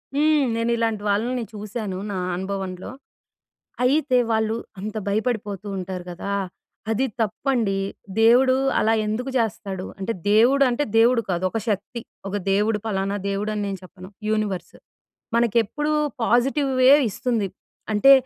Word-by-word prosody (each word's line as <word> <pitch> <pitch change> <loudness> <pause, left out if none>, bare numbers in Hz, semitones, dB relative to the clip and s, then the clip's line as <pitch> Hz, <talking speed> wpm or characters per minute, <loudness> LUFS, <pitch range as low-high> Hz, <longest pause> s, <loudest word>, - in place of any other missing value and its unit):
హ్మ్. 300 -1 +3
నేనిలాంటి 230 -2 0
వాళ్ళని 235 +5 0
చూసాను. 210 -2 -5
నా 195 - -3 0.2
అనుభవంలో. 190 0 -4 0.9
అయితే 265 0 +3
వాళ్ళు 220 0 +1 0.2
అంత 215 +3 -5
భయపడిపోతూంటారు 200 -4 -2
గదా! 200 +3 -4 0.6
అది 235 +5 +1
తప్పండి. 225 -1 0 0.4
దేవుడు 250 +3 +6 0.2
అలా 220 +1 +3
ఎందుకు 225 +5 -2
జెస్తాడు, 200 -5 -2
అంటే 205 +4 -2 0.2
దేవుడు 245 +6 +5
అంటే 245 +4 0
దేవుడు 235 +1 +5
కాదు 175 0 -1
ఒక 225 - -1
శక్తి. 215 +3 -2 0.3
ఒక 195 - -3 0.2
దేవుడు 210 +2 +2
పలానా 195 -1 -1
దేవుడని 210 +1 -2
నేను 195 -1 -3
చెప్పను 185 0 -12 0.2
యూనివర్స్. 215 -4 -2 0.6
మనకెప్పుడు 235 +6 +1 0.3
పాజిటివ్ 270 +5 +2
వే 255 - +7 0.2
ఇస్తుంది. 220 0 -1 0.4
అంటే 215 +6 +6
220 Hz, 120 wpm, -23 LUFS, 200-240 Hz, 0.9 s, వే